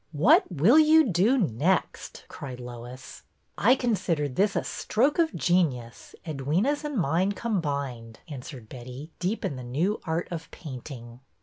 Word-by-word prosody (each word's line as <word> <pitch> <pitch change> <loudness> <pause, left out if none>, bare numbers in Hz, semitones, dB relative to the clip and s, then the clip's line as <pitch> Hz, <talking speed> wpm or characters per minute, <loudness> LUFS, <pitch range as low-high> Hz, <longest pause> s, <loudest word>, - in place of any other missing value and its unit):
What 245 - +4
will 185 - +5
you 315 +1 +6
do 200 +10 +3
next? 175 - -1
" - - -30
cried 130 -3 -8
Lois. 125 +1 -9 0.3
I 245 +5 +4
consider 190 - 0
this 195 +10 0
a - - 0
stroke 270 +9 0
of 325 -1 +2
genius, 140 -10 0
Edwyna^s 165 - 0
and 295 -3 -3
mine 180 +4 +1
combined," 140 - -3
answered 130 -5 -9
Betty, 130 +6 -9
deep 185 +6 -2
in 140 - -3
the 130 - -7
new 160 - -1
art 165 +1 -1
of 165 -2 -6
painting. 125 -5 -9
160 Hz, 145 wpm, -27 LUFS, 130-205 Hz, 0.3 s, you